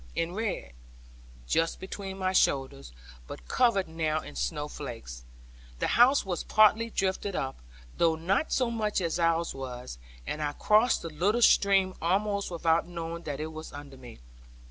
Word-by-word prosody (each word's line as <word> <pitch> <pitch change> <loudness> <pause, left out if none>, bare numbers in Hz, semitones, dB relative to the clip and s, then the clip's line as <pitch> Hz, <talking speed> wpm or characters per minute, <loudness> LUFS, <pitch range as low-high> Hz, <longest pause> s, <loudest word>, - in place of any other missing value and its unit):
in 165 +1 -1
red, 210 - -3 0.7
just 165 - 0
between 190 0 -6
my 185 -1 -1
shoulders, 130 - +1 0.4
but - - -10
covered 230 -7 +2
now 160 -1 -1
in - - -10
snow 65 - -2
flakes. 115 - -8 0.5
The - - -1
house 250 +2 +5
was 180 -3 -3
partly 215 +2 +4
drifted 195 -1 -1
up, 135 - -3 0.4
though 165 -1 +3
not 185 - 0
so 250 -3 +1
much 215 -3 -1
as 170 -1 -1
ours 165 0 +1
was; 125 - -7 0.3
and 155 - -4
I 145 -1 -1
crossed 215 +9 +3
the 165 - -4
little 205 +10 +1
stream 195 -3 +4
almost 200 +4 0
without 165 -1 +1
knowing 170 -1 -5
that 145 -2 -4
it 155 +1 -5
was 155 0 -8
under 145 -1 -10
me. 125 - -12
170 Hz, 160 wpm, -28 LUFS, 145-200 Hz, 0.7 s, house